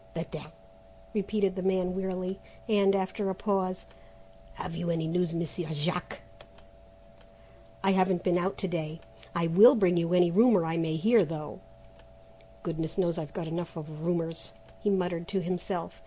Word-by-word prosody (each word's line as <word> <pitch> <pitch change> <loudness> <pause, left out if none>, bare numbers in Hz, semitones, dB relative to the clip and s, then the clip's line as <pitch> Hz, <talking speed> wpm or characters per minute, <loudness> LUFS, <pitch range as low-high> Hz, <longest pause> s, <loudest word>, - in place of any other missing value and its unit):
"Better," - - -4 0.7
repeated 200 -2 0
the 185 - -3
man 185 -1 +1
wearily; 190 0 -3 0.3
and, 200 -3 +4
after 195 +1 -1
a 190 - -2
pause, 185 -2 -1 0.7
"Have 165 - -6
you 175 0 -2
any 165 -1 0
news, 175 +1 0
Monsieur 170 0 -3
Jack?" 170 +4 -3 1.6
"I 195 - +4
haven't 185 -1 +2
been 180 -1 +2
out 190 +2 -1
to 190 - -2
day. 160 -2 -3 0.4
I 170 - +1
will 205 +11 +8
bring 185 -6 +3
you 170 0 +1
any 180 -1 +5
rumour 210 -2 +5
I 160 0 -1
may 165 -1 0
hear, 220 +6 +4
though 155 -3 -6 1.0
goodness 165 0 -3
knows 175 -3 +1
I've 150 -3 -6
got 170 -3 -4
enough 170 +1 -4
of 155 0 -8
rumours," 165 -1 -2 0.3
he 205 - 0
muttered 180 -3 0
to 195 - -1
himself. 175 - -3
180 Hz, 155 wpm, -29 LUFS, 165-190 Hz, 1.6 s, will